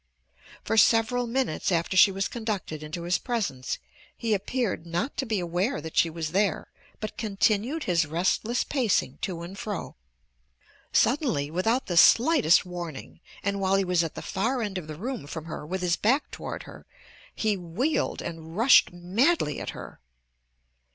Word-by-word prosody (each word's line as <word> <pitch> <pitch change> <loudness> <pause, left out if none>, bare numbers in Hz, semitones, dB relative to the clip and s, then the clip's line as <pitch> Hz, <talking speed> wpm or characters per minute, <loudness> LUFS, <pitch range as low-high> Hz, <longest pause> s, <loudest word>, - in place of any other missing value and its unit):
For 225 - -1
several 230 +3 +4
minutes 230 -6 -1
after 170 +2 0
she 195 +1 +7
was 195 +1 -1
conducted 210 -9 -4
into 155 +3 -6
his 175 +1 +1
presence 180 - -2 0.4
he 230 -2 0
appeared 200 -4 -2
not 175 - -2
to 265 - -2
be 215 -3 0
aware 180 +8 -1
that 160 +1 -8
she 165 - +4
was 160 -1 -4
there 195 -1 0 0.3
but 215 - -6
continued 220 +7 0
his 170 -3 +1
restless 185 +9 0
pacing 215 - 0
to 170 -3 -3
and 180 +3 -8
fro. 210 -4 -5 1.0
Suddenly, 230 - +2
without 225 +9 +1
the 175 -3 -2
slightest 235 - +6
warning, 165 - -7 0.2
and 200 0 -1
while 190 0 +2
he 195 -1 +2
was 180 -2 +2
at 165 - -5
the - - -6
far 230 +6 -1
end 200 -3 -3
of 160 - -10
the 155 - -6
room 230 - -5
from 160 +1 -6
her 160 - -6
with 185 +2 -3
his 175 -1 +1
back 260 +7 +1
toward - - -6
her, - - -13 0.5
he 215 -2 +1
wheeled 195 - -1
and 165 0 -7
rushed 240 +4 +6
madly 180 - +1
at - - -5
her. - - -9
190 Hz, 165 wpm, -27 LUFS, 170-230 Hz, 1.0 s, she